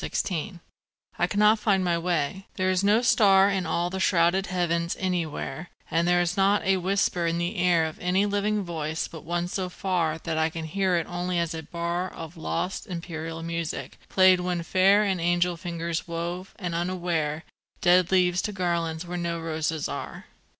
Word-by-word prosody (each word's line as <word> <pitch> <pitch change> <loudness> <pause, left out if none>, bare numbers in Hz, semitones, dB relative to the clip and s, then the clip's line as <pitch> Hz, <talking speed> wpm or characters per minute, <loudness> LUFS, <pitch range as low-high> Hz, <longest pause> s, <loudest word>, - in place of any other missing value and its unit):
Credo 180 0 -3 0.6
I - - +3
cannot 210 +1 +4
find 195 -3 +2
my 175 -1 +1
way: 170 +1 -1
there 185 0 +1
is 185 +1 +1
no 210 +4 +4
star 195 -5 +5
In 190 -3 -1
all 175 +2 0
the 190 - -3
shrouded 185 +1 +2
heavens 170 -2 -1
anywhere; 175 -2 -3 0.2
And 165 +1 +2
there 175 0 +4
is 175 0 0
not 200 +1 +3
a 190 0 +3
whisper 185 -2 0
in 165 0 0
the 175 +5 -2
air 175 -2 +3
Of 160 - -6
any 185 +3 +2
living 205 0 0
voice 160 -2 -3
but 160 - -10
one 175 +2 -2
so 185 0 -3
far 175 -4 -1
That 160 -1 -3
I 160 0 +2
can 165 -1 -6
hear 185 +2 0
it 170 -2 0
only 175 0 -3
as 170 -1 0
a 160 - -4
bar 170 +3 -3
Of 165 +1 -9
lost, 170 +3 -3
imperial 165 -2 -5
music, 165 -1 -4
played 185 -1 +5
when 180 -1 -2
fair 195 +4 +4
And 190 -4 0
angel 175 +1 +2
fingers 170 -1 -4
wove, 175 +3 -5
and 180 -5 -4
unaware, 170 -3 -1 0.4
Dead 180 -1 +4
leaves 180 -1 +3
to 210 - -3
garlands 170 -3 -2
where 175 0 -4
no 170 -1 -2
roses 160 -1 -2
are. - - -6
175 Hz, 185 wpm, -26 LUFS, 165-185 Hz, 0.6 s, star